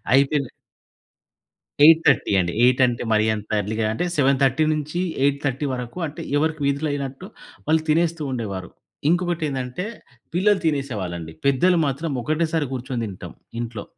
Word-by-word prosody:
అయితేలే 140 0 +3 1.3
8:30 160 -7 +5
అండి. 85 -1 -1
8 125 +1 +4
అంటే 120 -1 -2
మరీ 110 0 +3
అంత 105 0 -8
ఎర్లీ‌గా 110 +2 -2
అంటే 110 - -2
7:30-8:30 145 0 +1
వరకు 125 +6 -6
అంటే 150 - -7 0.2
ఎవరికి 155 +1 0
వీధులైనట్టు 140 -1 -2 0.4
వాళ్ళు 160 0 +3
తినేస్తూ 165 +1 +1
ఉండేవారు. 100 -6 -4 0.4
ఇంకొకటి 175 -2 0
ఏందంటే 130 +4 -4 0.5
పిల్లలు 195 +2 +3
తినేసేవాళ్ళండి. 100 - -2
పెద్దలు 170 +7 +4
మాత్రం 140 +4 -2
ఒకటేసారి 155 -1 0
కూర్చొని 125 -1 -3
తింటాం 95 -3 -9 0.3
ఇంట్లో. 115 -3 -6
140 Hz, 115 wpm, -23 LUFS, 120-160 Hz, 1.3 s, 8:30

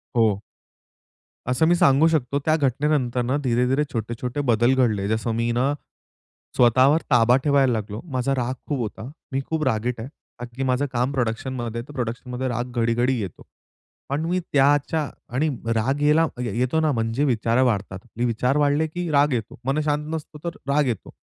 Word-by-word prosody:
हो. 110 -4 +2 1.1
असं 125 +6 +2
मी 175 - +4
सांगू 140 -1 +5
शकतो 140 -4 0
त्या 155 0 +4
घटनेनंतर 135 -2 +1
ना 125 +3 0
धीरे-धीरे, 125 +3 +2
छोटे-छोटे 120 +4 -3
बदल 120 +3 +4
घडले. 110 -6 +1
जसं 110 +2 -1
मी 115 +1 0
ना 130 +4 +1 0.8
स्वतःवर 130 +6 +5
ताबा 120 0 +5
ठेवायला 140 -4 +3
लागलो. 105 -1 -4
माझा 130 +1 0
राग 125 0 -1 0.2
खूप 145 -3 -1
होता. 110 +1 -5 0.2
मी 135 - -1
खूप 160 -1 -1
रागीट 120 -1 -1
आहे. 115 - -5 0.3
कारण 120 0 -9
की 135 - -2
माझं 130 +2 +1
काम 125 +3 0
प्रोडक्शनमध्ये 120 -1 -2
आहे 125 - -13
तर 145 - -11
प्रोडक्शनमध्ये 125 +1 -4
राग 120 0 -3
घडी-घडी 120 +2 +1
येतो. 95 -5 -6 0.7
पण 145 +4 -1
मी 180 +2 0
त्याच्या 145 +2 +2 0.3
आणि 155 +4 +2 0.3
राग 135 +6 0
यायला 150 +2 +4 0.2
येतो 125 +6 0
ना 155 -1 +2
म्हणजे 115 +2 -1
विचार 120 -1 +1
वाढतात. 100 -6 -1
म्हणजे 120 +1 -3
विचार 125 +4 0
वाढले 150 +2 +2
की 175 +2 -4
राग 145 0 +3
येतो, 115 -2 -4
मन 135 +3 +1
शांत 150 0 0
नसतो 155 -1 -6
तर 170 - -5
राग 145 +1 +2
येतो. 115 -5 -3
125 Hz, 170 wpm, -23 LUFS, 115-145 Hz, 1.1 s, सांगू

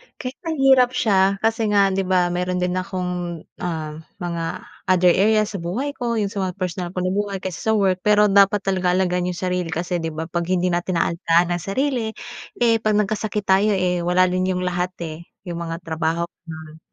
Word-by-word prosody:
Kahit 255 +1 -7
mahirap 265 -5 +4
siya 195 -3 +3
kasi 225 0 +1
nga, 200 -1 +4
di 190 -1 -1
ba 180 -2 +2
meron 180 +1 -1
din 180 - 0
akong, 180 -3 -4 0.2
ah, 160 -3 -4 0.2
mga 170 -1 -3 0.2
other 180 -1 +5
areas 215 +3 +3
sa 200 - -5
buhay 205 +13 -3
ko 240 -4 -3
yung 205 -3 -1
sa 205 - -4
mga 180 - -6
personal 180 -1 -4
ko 180 - -1
na 185 - 0
buhay 200 -1 -2
kaysa 185 +3 -5
sa 220 - +4
work. 190 -3 +2
Pero 210 +1 +4
dapat 200 0 +4
talaga 185 -2 +1
aalagaan 180 -1 +1
yung 180 - -3
sarili 180 -1 -2
kasi, 175 +1 -2
di 165 - -3
ba 160 0 -4
'pag 170 +1 -3
hindi 180 0 +1
natin 175 +1 -1
aalagaan 170 +1 +1
ang 175 - 0
sarili, 225 - -1 0.4
eh, 230 -2 +3
pag 215 -1 +1
nagkasakit 210 0 -1
tayo, 200 +2 +3
eh, 180 -1 +1
wala 180 +1 +3
rin 185 0 +1
yung 180 -1 -1
lahat, 180 0 -2
eh, 165 +1 -7 0.2
yung 175 -3 -5
mga 170 0 -5
trabaho 165 +1 -1 0.2
Hmm. 160 -1 -9
185 Hz, 200 wpm, -22 LUFS, 175-205 Hz, 0.4 s, other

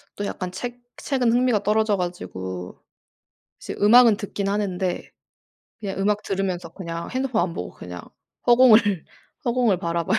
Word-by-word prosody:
또 205 - -3
약간 185 -2 -4
책 245 +6 -6 0.2
책은 255 -4 +1
흥미가 245 -3 +2
떨어져 215 0 +2
가지고 95 - -6 0.8
이제 - - -6
음악은 230 +1 +7
듣긴 205 -2 -4
하는데 190 -3 -2 0.7
그냥 195 -3 -4
음악 205 +1 +1
들으면서 190 -4 -2
그냥 170 -2 -6
핸드폰 255 -6 0
안 170 -1 -2
보고 90 - -5
그냥 90 -1 -9 0.4
허공을, 230 -7 +5 0.4
허공을 235 -6 +2
바라봐요. 170 +4 0
200 Hz, 310 characters per minute, -23 LUFS, 180-230 Hz, 0.8 s, 음악은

